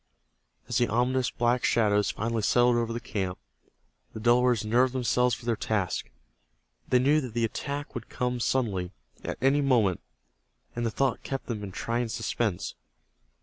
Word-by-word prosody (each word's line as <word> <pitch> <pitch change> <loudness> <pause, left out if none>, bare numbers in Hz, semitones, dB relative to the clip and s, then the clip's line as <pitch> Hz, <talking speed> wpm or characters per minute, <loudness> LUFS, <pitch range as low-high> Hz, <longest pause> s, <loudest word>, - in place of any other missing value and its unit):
As - - 0
the 120 - +3
ominous 125 +3 +1
black 120 +1 +1
shadows 105 -3 +3
finally 115 0 -2
settled 120 +3 +4
over 115 -1 0
the 115 - -3
camp, 95 -5 -3 0.8
the - - -4
Delawares 120 -1 +3
nerved 125 +4 +3
themselves 125 -1 +2
for - - -13
their 120 -1 +1
task. 100 - -2 0.8
They 125 - +5
knew 145 +5 +3
that 125 -4 -7
the 115 -1 +2
attack 140 +5 -4
would - - -7
come 125 -1 -2
suddenly, 105 -8 0 0.3
at - - -4
any 140 +2 +4
moment, 115 - +2 0.7
and 120 0 -1
the - - 0
thought 130 +2 0
kept 135 -1 -4
them 110 -4 -4
in 100 - -6
trying 115 +5 -2
suspense. 115 -4 -2
120 Hz, 160 wpm, -28 LUFS, 110-125 Hz, 0.8 s, They